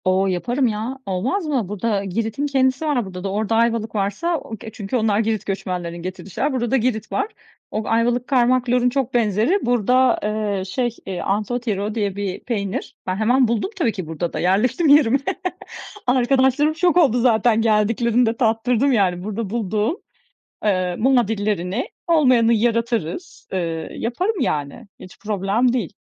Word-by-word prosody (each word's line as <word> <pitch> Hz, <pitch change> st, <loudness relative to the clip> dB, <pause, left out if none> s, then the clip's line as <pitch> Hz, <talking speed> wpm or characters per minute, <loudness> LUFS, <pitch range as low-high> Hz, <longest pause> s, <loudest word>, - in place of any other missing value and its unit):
O, 190 Hz, +1 st, +2 dB
yaparım 240 Hz, +8 st, 0 dB
ya, 225 Hz, +4 st, -3 dB
olmaz 225 Hz, -, -1 dB
mı? 265 Hz, -9 st, -1 dB
Burada 210 Hz, 0 st, -1 dB
Girit'in 225 Hz, +8 st, -2 dB
kendisi 265 Hz, +1 st, +1 dB
var 275 Hz, -7 st, 0 dB
burada 180 Hz, -1 st, -8 dB
da. 195 Hz, -, -2 dB
Orada 215 Hz, +2 st, 0 dB
Ayvalık 230 Hz, -1 st, +1 dB
varsa 210 Hz, -, 0 dB
o 225 Hz, -6 st, -8 dB
ke 220 Hz, +2 st, -9 dB
çünkü 205 Hz, +1 st, -5 dB
onlar 215 Hz, -2 st, +1 dB
Girit 220 Hz, -2 st, -1 dB
göçmenlerinin 180 Hz, -3 st, -4 dB
getirdği 185 Hz, +1 st, -7 dB
şeyler. 275 Hz, +9 st, -1 dB
Burada 240 Hz, -3 st, -1 dB
da 270 Hz, -, +4 dB
Girit 225 Hz, -3 st, -1 dB
var. 405 Hz, -, 0 dB, 0.4 s
O 215 Hz, -, -2 dB
Ayvalık 235 Hz, +2 st, +1 dB
kaymak, 250 Hz, -1 st, +2 dB
lorun 250 Hz, 0 st, +3 dB
çok 265 Hz, 0 st, -2 dB
benzeri. 230 Hz, -, +2 dB
Burada, 245 Hz, +2 st, +3 dB
eee, 210 Hz, -2 st, -1 dB
şey, 240 Hz, +4 st, -2 dB
eee, 185 Hz, -2 st, -4 dB
anthotyro 210 Hz, 0 st, -2 dB
diye 205 Hz, -4 st, -1 dB
bir 200 Hz, -2 st, -3 dB
peynir. 200 Hz, -5 st, -3 dB
Ben 185 Hz, -, 0 dB
hemen 245 Hz, +5 st, +3 dB
buldum 230 Hz, -, -1 dB
tabii 270 Hz, -11 st, +1 dB
ki 185 Hz, -6 st, -6 dB
burada 160 Hz, +2 st, -4 dB
da, -, -, -3 dB
yerleştim 230 Hz, -, +2 dB
yerime. 280 Hz, -3 st, +5 dB, 0.9 s
Arkadaşlarım 265 Hz, +4 st, +3 dB
şok 350 Hz, -1 st, +2 dB
oldu 270 Hz, -9 st, +4 dB
zaten 230 Hz, -1 st, +3 dB
geldiklerinde 230 Hz, +2 st, +2 dB
tattırdım, 245 Hz, +3 st, +2 dB
yani, 185 Hz, -5 st, +1 dB
burada 215 Hz, 0 st, -4 dB
bulduğum 215 Hz, -, -1 dB, 0.7 s
ııı, 185 Hz, -4 st, 0 dB
muadillerini. 215 Hz, -4 st, +1 dB, 0.2 s
Olmayanı 255 Hz, -9 st, +4 dB
yaratırız, 230 Hz, -, -1 dB
ııı, 165 Hz, -3 st, -3 dB
yaparım, 360 Hz, -, -2 dB
yani, 155 Hz, -, -2 dB
hiç 185 Hz, -, -12 dB
problem 210 Hz, +4 st, 0 dB
değil. 230 Hz, -, -2 dB
225 Hz, 155 wpm, -21 LUFS, 200-250 Hz, 0.9 s, yerime